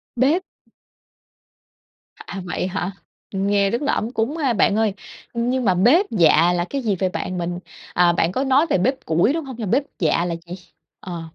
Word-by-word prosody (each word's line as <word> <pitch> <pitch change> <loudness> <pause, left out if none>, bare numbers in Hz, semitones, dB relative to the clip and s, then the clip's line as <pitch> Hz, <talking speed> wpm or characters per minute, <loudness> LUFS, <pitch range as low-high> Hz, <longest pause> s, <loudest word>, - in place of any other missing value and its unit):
Bếp. 285 +9 +2 1.7
À, 195 - -8
vậy 180 +1 -2
hả? 190 0 -3 0.4
Nghe 200 0 +1
rất 235 - -2
là 285 - 0
ấm 225 - -2
cúng 250 +8 -1
ha. 275 -6 +1
Bạn 205 -1 +3
ơi, 220 -2 +1 0.4
nhưng 245 +2 -1
mà 190 - +4
bếp 255 - +4
dạ 170 -3 +4
là 175 -1 0
cái 275 - -2
gì 215 -5 0
vậy 190 - +1
bạn? 185 -1 -4
Mình 175 0 -3 0.3
à, 175 -1 +4
bạn 165 0 +1
có 260 +8 -1
nói 275 +3 +3
về - - +3
bếp 260 +9 -1
củi, 170 - +2
đúng 325 -2 -3
hông? 265 -2 -7
Mà 220 - -3
bếp 250 +9 +2 0.2
dạ 165 0 +2
là 170 -1 -2
gì? 175 - -6 0.4
Ờ. 175 -3 -6
205 Hz, 195 wpm, -21 LUFS, 180-260 Hz, 1.7 s, mà